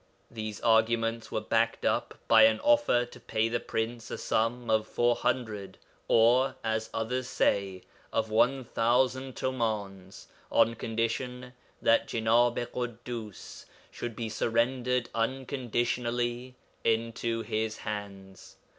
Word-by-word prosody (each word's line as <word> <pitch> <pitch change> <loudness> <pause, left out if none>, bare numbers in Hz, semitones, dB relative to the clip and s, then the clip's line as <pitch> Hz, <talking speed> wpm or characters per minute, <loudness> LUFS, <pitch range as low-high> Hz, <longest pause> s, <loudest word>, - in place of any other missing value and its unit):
These 110 -2 -5
arguments 115 0 +2
were 110 - -1
backed 115 +1 0
up - - 0
by 110 -1 +8
an 110 0 +3
offer 290 - +3
to 120 - -14
pay 110 +1 0
the 120 - 0
Prince 115 +1 -3
a - - -4
sum 120 +2 -1
of 110 0 +2
400 110 -4 -1 0.3
(or, 125 +4 +4
as 110 0 -1
others 125 +3 -2
say, 95 -2 0 0.3
of 110 -1 -1
1000) 125 +2 +1
tumāns 105 -7 -3 0.3
on 115 - +4
condition 125 +3 -3 0.3
that 115 - +4
Jenāb 115 +1 +2
i 120 - -1
Ḳuddus 120 -3 -6 0.3
should 120 -2 -6
be 115 0 -3
surrendered 120 +3 0
unconditionally 120 0 -1 0.3
into 115 0 0
his 110 0 -2
hands. 100 -2 -7
115 Hz, 115 wpm, -29 LUFS, 110-120 Hz, 0.3 s, by